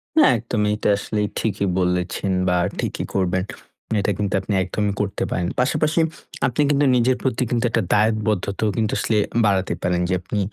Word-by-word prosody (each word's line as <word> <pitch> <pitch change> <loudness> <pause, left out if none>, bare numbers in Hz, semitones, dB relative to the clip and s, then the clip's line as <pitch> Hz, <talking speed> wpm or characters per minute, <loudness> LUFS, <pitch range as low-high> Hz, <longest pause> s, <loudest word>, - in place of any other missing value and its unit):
হ্যাঁ, 310 -3 +6
একদমই। 105 -2 -1
এটা - - 0
আসলে 105 0 -2 0.2
ঠিকই 100 -2 -1
বলেছেন 90 +2 0 0.2
বা, 90 - +2 0.2
ঠিকই - - -2
করবেন। 95 0 +1 0.5
এটা 105 - 0
কিন্তু 100 -2 -1
আপনি 100 - -3
একদমই 100 +2 -1
করতে 100 -1 -2
পারেন। 90 -1 -1
পাশাপাশি 155 +5 +1 0.5
আপনি 125 +4 0
কিন্তু 145 0 +3
নিজের 125 +1 +3
প্রতি 130 -1 0
কিন্তু 120 0 0
একটা 115 - +1
দায়বদ্ধতাও 105 -1 +1
কিন্তু 110 -1 0
আসলে 110 - +1 0.3
বাড়াতে 95 -2 +1
পারেন। 90 0 0
যে - - +1
আপনি 105 +3 -3
105 Hz, 165 wpm, -22 LUFS, 95-115 Hz, 0.5 s, হ্যাঁ